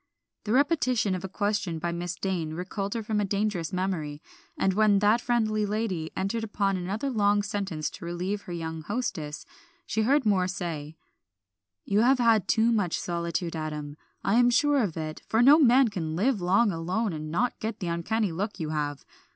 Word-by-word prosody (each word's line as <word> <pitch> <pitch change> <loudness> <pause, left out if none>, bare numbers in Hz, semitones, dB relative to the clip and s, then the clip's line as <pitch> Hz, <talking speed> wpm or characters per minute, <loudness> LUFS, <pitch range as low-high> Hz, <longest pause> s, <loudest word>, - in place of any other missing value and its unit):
The 210 - -2
repetition 255 - +2
of 185 0 -3
a 190 - -5
question 205 -4 -1
by 170 +2 -2
Miss 175 +1 -4
Dane 175 -5 -2
recalled 195 +4 -4
her 230 - -2
from 215 0 -1
a - - +1
dangerous 200 -4 -1
memory, 180 -6 -2 0.4
and 190 - +2
when 210 0 +4
that 210 +4 +3
friendly 220 -3 +1
lady 205 -6 -2
entered 195 +4 -1
upon 200 -2 0
another 195 +8 -3
long 205 -3 +2
sentence 195 -6 -3
to - - -9
relieve 180 +4 -3
her 180 - -10
young 160 -1 -4
hostess, 170 -6 -4 0.4
she 220 - -1
heard 265 +4 +3
Moor 190 -3 +3
say 165 -4 -5 0.9
"You 200 +1 +2
have 255 +4 +5
had 230 -4 +3
too 225 +1 +3
much 205 -7 0
solitude, 170 0 -3
Adam; 150 -2 -5 0.3
I 210 +5 +3
am 245 0 +5
sure 285 +3 +3
of 190 -8 -2
it, 155 -1 -5
for 225 +2 +3
no 290 +5 +8
man 260 -3 +5
can 160 -6 -3
live 215 +3 +1
long 195 +5 +3
alone 185 +5 -1
and 155 0 -5
not 245 +10 0
get 220 0 -4
the 185 - -4
uncanny 195 +5 -1
look 200 +6 -4
you 160 -2 -3
have. 145 -2 -3
195 Hz, 185 wpm, -27 LUFS, 170-220 Hz, 0.9 s, no